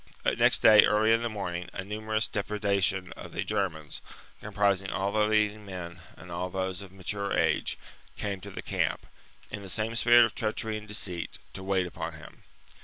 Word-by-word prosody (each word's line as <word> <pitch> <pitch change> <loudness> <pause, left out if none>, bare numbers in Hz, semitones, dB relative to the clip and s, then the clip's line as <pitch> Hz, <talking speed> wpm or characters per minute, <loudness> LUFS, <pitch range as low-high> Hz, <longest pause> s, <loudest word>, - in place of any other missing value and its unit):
Next - - +4
day, 105 -1 +9
early 110 +1 +4
in 115 - +3
the 120 - -1
morning, 90 -5 -4
a 95 - -4
numerous 110 +2 -1
deputation 100 -2 0
of - - -10
the - - -1
Germans, 80 -6 -2 0.4
comprising 100 -2 +1
all 100 +1 -1
the 105 0 +2
leading 105 0 +2
men 90 -3 -7 0.2
and 90 +1 -11
all 90 +2 -3
those 95 0 -3
of 100 -2 -10
mature 100 +1 -3
age, - - +1 0.4
came 100 -2 -3
to - - -8
the - - -7
camp, - - -1 0.5
in 100 - -5
the 95 - -8
same 110 +3 -1
spirit 120 0 +7
of 110 - -4
treachery 110 0 -2
and 105 0 -7
deceit, 90 - -3 0.2
to 95 - -7
wait 95 -1 +1
upon 90 - -5
him. - - -12
100 Hz, 180 wpm, -29 LUFS, 95-110 Hz, 0.5 s, day